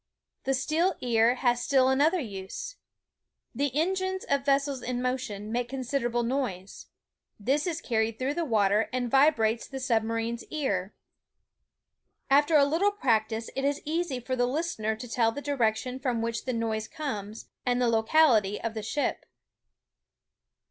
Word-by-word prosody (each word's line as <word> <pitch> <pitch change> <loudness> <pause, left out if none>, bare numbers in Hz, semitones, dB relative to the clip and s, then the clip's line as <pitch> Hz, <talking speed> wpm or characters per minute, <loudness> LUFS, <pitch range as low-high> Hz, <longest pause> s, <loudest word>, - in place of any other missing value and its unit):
The 270 - +2
steel 320 +7 +1
ear 235 0 +3
has 245 -1 +1
still 265 -2 +3
another 300 +7 +3
use. 245 - -6 0.8
The 280 +4 0
en 350 +4 +2
gines 375 0 -2
of 280 -1 0
vessels 275 -1 +1
in 245 0 -3
motion 245 -5 -3
make 240 +1 -1
considerable 245 -2 -1
noise. 230 -7 -3 0.5
This 275 - 0
is 335 -1 -2
carried 220 -2 0
through 265 +2 -1
the 340 - -1
water 215 -5 +2
and 245 -2 -2
vibrates 240 -6 +3
the 270 - -6
sub 235 -3 +2
marine's 230 +1 -3
ear. 205 -11 -2 1.4
After 290 +3 +5
a 280 - +6
Uttle 390 +8 +1
practice 225 - 0
it 270 - -2
is 285 +1 +1
easy 315 -3 -1
for 255 +2 -3
the 245 -1 +1
listener 250 -7 -1
to 240 +3 -8
tell 230 -1 +2
the 255 - -6
direc 260 -7 +1
tion 255 +3 -5
from 245 -4 -1
which 230 -1 -3
the 255 - -1
noise 220 -2 -2
comes, 215 -8 -6
and 245 -1 +1
the 245 - +2
locality 225 -3 +3
of 230 - -3
the 220 - -4
ship. 255 +7 -2
250 Hz, 160 wpm, -28 LUFS, 225-285 Hz, 1.4 s, a